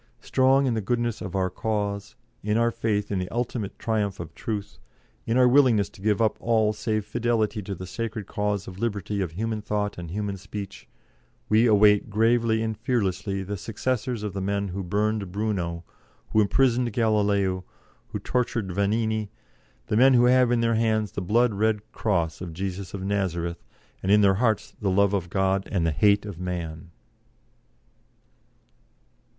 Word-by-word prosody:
Strong 135 +1 +3
in 125 - +1
the 110 - -1
goodness 120 +2 -1
of 95 0 -5
our 95 -1 0
cause, 105 -1 -3 0.3
in 105 +1 0
our 115 0 +3
faith 105 -3 -1
in 100 - 0
the 90 - -3
ultimate 120 -3 -3
triumph 105 -4 -1
of 80 -1 -7
Truth, 105 -3 -5 0.5
in 115 - +1
our 125 -1 +6
willingness 125 -6 +4
to - - -16
give 105 +1 +1
up 110 -2 +2
all 110 -2 +2
save 110 -1 -2
fidelity 115 -3 0
to 100 0 -5
the 95 - -7
sacred 110 +2 -4
cause 105 0 -2
of 95 0 -9
liberty 105 -2 -2
of 85 -4 -3
human 110 +3 -2
thought 105 -2 -2
and 85 -2 -7
human 100 +2 -3
speech, 100 0 -8 0.6
we 110 +3 +5
await 105 -1 +5
gravely 110 +1 +2
and 110 -1 -3
fearlessly 100 -5 -1
the 100 +2 -4
successors 115 +2 -2
of 105 -3 -3
the 95 - -3
men 100 +1 -1
who 95 +2 -4
burned 105 +1 -1
Bruno, 90 -5 -2 0.5
who 110 - +4
imprisoned 120 +2 +2
Galileo, 100 -4 +1 0.4
who - - -4
tortured 115 -5 -1
Vanini 110 +2 0 0.6
the 105 - -1
men 130 +2 +6
who 120 0 +5
have 125 -1 +4
in 120 -1 +2
their 115 0 +2
hands 110 -3 +1
the 100 - -4
blood 115 +5 +2
red 105 +1 0
cross 85 -7 -1
of 85 -3 -6
Jesus 95 +2 -5
of 95 - -5
Nazareth, 90 -4 -2 0.4
and 95 - 0
in 105 0 +6
their 100 -1 +5
hearts 110 -4 +1
the 100 - +1
love 100 +1 +3
of 90 -3 -1
God 95 +1 0
and 90 -5 +1
the 80 - +2
hate 100 +6 +3
of 100 -5 -7
man." 85 -2 -5
105 Hz, 170 wpm, -25 LUFS, 95-115 Hz, 0.6 s, our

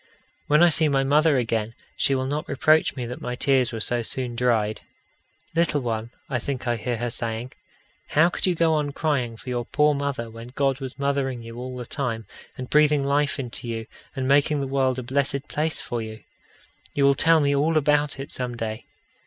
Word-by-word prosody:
When 150 +3 +5
I 175 - +7
see 160 -1 +3
my 135 -1 +2
mother 150 +1 +4
again, 115 -2 -1 0.2
she 135 - +2
will 130 0 -1
not 145 +3 -3
reproach 155 +3 +3
me 125 -3 -4
that 125 +1 -7
my 125 0 -3
tears 130 -1 +2
were 115 - -4
so 120 +2 0
soon 120 +1 -3
dried. 115 -3 +1 0.7
"Little 165 -3 +2
one," 115 -2 -3 0.2
I 130 -3 -1
think 130 +1 -4
I 120 - +2
hear 120 +2 -3
her 120 +1 -2
saying, 115 +1 -4 0.6
"how 160 +3 +4
could 180 - -1
you 180 - +2
go 165 -1 +3
on 150 -2 0
crying 130 -8 -1
for 125 - -9
your 120 -1 -1
poor 150 +5 +2
mother 140 -4 -2
when 115 +2 -10
God 135 -1 +1
was 130 -1 -7
mothering 140 -3 -1
you 115 0 -9
all 125 0 -6
the 125 - -5
time, 115 -5 -3 0.3
and 130 - -5
breathing 150 -1 +4
life 140 +1 +1
into 120 -2 -5
you, 115 -1 -4 0.3
and 130 -1 -2
making 145 +2 +3
the 140 - -1
world 130 -1 +1
a 130 - -3
blessed 140 +2 0
place 155 +2 0
for 120 -1 -3
you? 110 0 -8 0.7
You 140 - +2
will 140 0 +6
tell 160 +3 +4
me 140 -1 +2
all 155 +3 +2
about 150 -1 +2
it 135 - -6
some 125 -2 -3
day." 110 0 -5
135 Hz, 210 wpm, -24 LUFS, 120-145 Hz, 0.7 s, I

